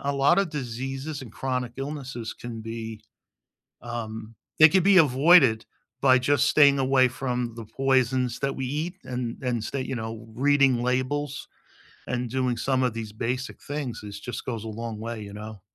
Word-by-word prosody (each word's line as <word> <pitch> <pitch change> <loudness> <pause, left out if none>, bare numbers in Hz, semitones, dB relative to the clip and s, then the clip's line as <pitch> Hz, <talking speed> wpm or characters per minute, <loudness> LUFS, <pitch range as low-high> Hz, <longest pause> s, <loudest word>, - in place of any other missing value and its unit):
a 140 - 0
lot 140 +5 +4
of 195 -4 +1
diseases 135 +2 -5
and 115 -5 -11
chronic 125 -2 -3
illnesses 135 -4 -5
can 120 -2 -7
be, 110 -1 -6 0.8
um 115 -2 -6 0.2
they 155 - +11
could 185 +3 +3
be 195 0 +6
avoided 135 -5 +6 0.4
by 130 -1 +6
just 140 +2 +2
staying 140 -2 +5
away 130 -1 +4
from 125 -2 -3
the 115 -1 -8
poisons 130 0 +1
that 140 0 -1
we 135 - -3
eat 155 +7 -3
and 125 -2 -4
and 120 -3 -1
stay 135 +4 -3
you 130 - -4
know, 110 -1 -6
reading 135 -2 +3
labels 135 +3 -1 0.6
and 125 -1 -2
doing 130 -1 0
some 130 +2 0
of 125 -3 0
these 110 -2 -5
basic 125 +4 -3
things 145 -6 -5
is 100 -1 -8
just 120 +1 -6
goes 115 -4 -4
a - - -5
long 115 0 -5
way, 115 0 -5
you 100 -1 -8
know? 105 0 -8
125 Hz, 175 wpm, -26 LUFS, 115-135 Hz, 0.8 s, they